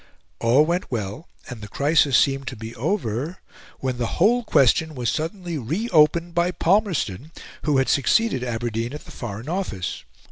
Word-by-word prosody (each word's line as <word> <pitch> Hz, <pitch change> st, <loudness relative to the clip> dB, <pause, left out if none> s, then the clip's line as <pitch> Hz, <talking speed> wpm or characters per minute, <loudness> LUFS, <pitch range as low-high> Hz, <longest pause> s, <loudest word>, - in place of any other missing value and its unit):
All 125 Hz, +6 st, +4 dB
went 175 Hz, +3 st, -1 dB
well, 110 Hz, -, -4 dB, 0.2 s
and 120 Hz, -4 st, -8 dB
the 105 Hz, -, -7 dB
crisis 140 Hz, +2 st, +3 dB
seemed 135 Hz, -1 st, +1 dB
to 130 Hz, -, -4 dB
be 110 Hz, +1 st, -8 dB
over, 140 Hz, -, -2 dB, 0.4 s
when 130 Hz, -2 st, -2 dB
the 120 Hz, -, 0 dB
whole 240 Hz, +7 st, +4 dB
question 155 Hz, -, +3 dB
was 120 Hz, -4 st, -1 dB
suddenly 170 Hz, 0 st, -3 dB
re 165 Hz, -, -2 dB
opened 170 Hz, +1 st, +3 dB
by 175 Hz, +1 st, +2 dB
Palmerston, 165 Hz, -, 0 dB, 0.3 s
who 150 Hz, -3 st, +2 dB
had 135 Hz, -, +2 dB
succeeded 180 Hz, -, +2 dB
Aberdeen 120 Hz, 0 st, -3 dB
at 150 Hz, -, -8 dB
the -, -, -12 dB
Foreign 115 Hz, +1 st, -7 dB
Office. 160 Hz, -, -3 dB
140 Hz, 165 wpm, -23 LUFS, 120-170 Hz, 0.4 s, All